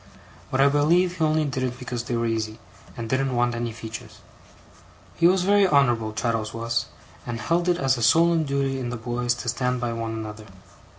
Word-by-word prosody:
But 130 - -1
I 135 - +6
believe 170 +6 +2
he - - +2
only 155 0 +2
did 135 -2 -3
it 125 -1 -2
because 125 -2 -4
they 120 - -2
were 115 - 0
easy, 110 -1 -2 0.4
and 115 -1 -4
didn't 130 +1 0
want 120 0 +2
any 120 0 -3
features. 110 0 -9 0.9
He 170 - +4
was 185 0 +3
very 200 +1 +4
honourable, 120 -8 +2
Traddles 110 0 -2
was, 115 0 -1 0.4
and 120 -1 -5
held 170 +7 0
it 175 - +2
as 135 -3 +1
a - - -4
solemn 165 +7 +4
duty 140 -2 -1
in 125 -2 -3
the 120 - -4
boys 120 +1 -1
to 120 - -8
stand 125 +1 0
by 120 -1 -2
one 115 -1 -3
another. 110 -1 -7
125 Hz, 200 wpm, -24 LUFS, 115-145 Hz, 0.9 s, I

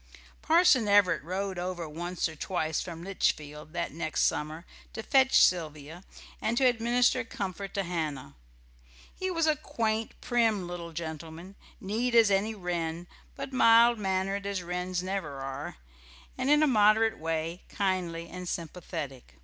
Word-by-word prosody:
Parson 315 -9 +4
Everett 200 -4 +4
rode 185 +3 -3
over 175 -2 -4
once 175 +4 -3
or 160 - -9
twice 160 -1 -2
from 170 -2 -7
Litchfield 155 -5 -2
that 170 0 -2
next 160 +1 -1
summer 155 +3 -1 0.3
to 220 - -5
fetch 265 +1 +4
Sylvia 160 0 +1 0.4
and 235 +2 0
to 265 - +3
administer 245 +1 +3
comfort 195 -3 -5
to 200 - 0
Hannah. 155 - -4 0.8
He 375 - -3
was 330 -3 +1
a 310 -1 +3
quaint, 225 -6 -2
prim 225 -6 +1
little 175 -1 -6
gentleman, 160 +2 -7 0.3
neat 230 +5 -1
as 225 -3 +6
any 205 +3 +1
wren, 175 -3 -3 0.3
but 275 -1 -6
mild 235 -1 +6
mannered 195 0 -1
as 195 -3 -2
wrens 180 +1 -3
never 185 -6 -3
are, 135 - -6 0.6
and 265 - -1
in 295 +1 +5
a - - +4
moderate 220 -2 +4
way 165 +2 -3
kindly 180 -4 -2
and 180 0 -7
sympathetic. 155 - -6
185 Hz, 145 wpm, -29 LUFS, 165-220 Hz, 0.8 s, as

